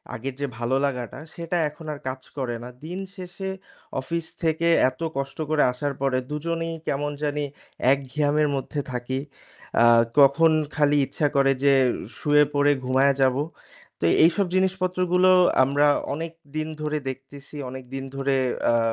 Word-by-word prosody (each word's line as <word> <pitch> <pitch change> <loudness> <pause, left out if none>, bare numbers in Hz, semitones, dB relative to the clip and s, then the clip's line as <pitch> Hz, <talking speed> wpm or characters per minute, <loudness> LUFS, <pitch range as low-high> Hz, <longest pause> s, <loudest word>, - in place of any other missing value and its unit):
আগের 135 +4 -5
যে 140 - 0
ভালো 120 +2 0
লাগাটা 130 -1 -4 0.2
সেটা 170 +1 -2
এখন 155 +2 -13
আর 145 - -9
কাজ 130 0 -4 0.2
করে 125 -3 -2
না। 125 - -7 0.2
দিনশেষে 190 +1 -6 0.5
অফিস 165 +4 -3 0.2
থেকে 160 +1 +1 0.2
এত 130 +5 -16 0.2
কষ্ট 135 0 -4
করে 155 -1 +3
আসার 140 +3 -3
পরে 135 -2 +1
২ 150 - -2
জনেই 165 0 -2
কেমন 145 +1 -1
জানি 145 0 -1 0.5
এক 140 - +4
ঘিয়ামের 150 +2 +2
মধ্যে 140 +2 -3
থাকি। 125 +2 -3 0.6
অ্যা 120 - +6 0.3
কখন 145 +4 +6 0.2
খালি 145 -1 +3
ইচ্ছা 150 - -1
করে 135 0 +4
যে 140 -1 +5 0.4
শুয়ে 150 -1 +4
পড়ে 145 0 +4
ঘুমায়া 135 +2 +3
যাব। 130 -1 +4 0.7
তো - - +1 0.2
এইসব 185 +4 +3
জিনিসপত্র 185 -1 0
গুলো 185 +1 +5 0.3
আমরা 145 +2 +3 0.3
অনেকদিন 160 -1 -5
ধরে 150 0 -1
দেখতেছি। 135 +2 -10
অনেকদিন 130 +1 -7
ধরে 135 0 0 0.3
অ্যা 115 - +4
145 Hz, 150 wpm, -24 LUFS, 135-165 Hz, 0.7 s, অ্যা